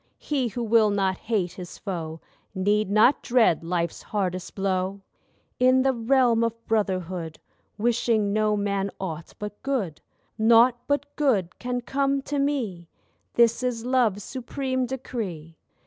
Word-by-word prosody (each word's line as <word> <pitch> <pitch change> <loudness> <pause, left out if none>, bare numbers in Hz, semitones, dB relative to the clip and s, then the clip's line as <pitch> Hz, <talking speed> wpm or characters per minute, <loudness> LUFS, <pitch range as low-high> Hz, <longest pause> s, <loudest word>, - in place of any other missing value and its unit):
He 275 -4 -1
who 235 +2 -4
will 225 -1 +4
not 195 -2 +1
hate 205 -6 -1
his 180 -1 -9
foe 165 -5 -5 0.3
Need 205 +2 +1
not 215 +7 +4
dread 225 -10 +3
life's 170 -1 -2
hardest 185 -3 -3
blow. 190 0 -1 0.6
In 255 +1 +5
the 270 0 +3
realm 235 -1 +3
of 230 0 -3
brotherhood 185 -6 -1 0.4
Wishing 225 -2 +1
no 215 0 +2
man 200 -1 -1
aught 165 -4 -6
but 210 0 -7
good, 235 - -2 0.4
Naught 235 +2 +5
but 285 0 -1
good 210 - +1
can 245 0 -2
come 275 +2 0
to 285 0 -2
me— 230 - -2 0.5
This 235 0 +4
is 245 -2 -2
Love's 240 -6 +2
supreme 260 +1 -3
decree. 205 -11 -5
220 Hz, 135 wpm, -25 LUFS, 190-250 Hz, 0.6 s, In